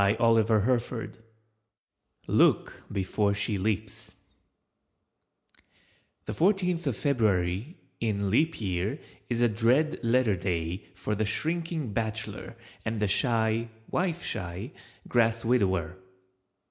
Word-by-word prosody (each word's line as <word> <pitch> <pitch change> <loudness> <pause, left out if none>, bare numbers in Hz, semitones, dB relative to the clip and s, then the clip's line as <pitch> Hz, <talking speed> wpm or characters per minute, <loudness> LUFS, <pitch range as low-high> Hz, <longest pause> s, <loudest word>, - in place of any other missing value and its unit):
LOOK - - +3
BEFORE 100 +1 +1
SHE 105 0 0
LEAPS 105 +1 -2 2.1
The - - -3
Fourteenth 180 -3 +1
of 125 -6 0
February 110 - 0 0.2
in 100 -3 0
Leap 160 +9 +2
Year 90 -5 -1 0.3
is 120 0 0
a 120 - +6
dread 120 +9 +2
letter 120 -1 +3
day 85 0 -2
for 105 - -3
the 110 +1 0
shrinking 160 +1 -2
bachelor 110 +1 -3 0.3
and 110 0 -2
the 105 - +2
shy 115 +2 +2 0.2
(wife 175 -2 0
shy) 95 +2 -4 0.4
grass 115 -1 +2
widower. 95 -7 +1
110 Hz, 95 wpm, -28 LUFS, 100-125 Hz, 2.1 s, a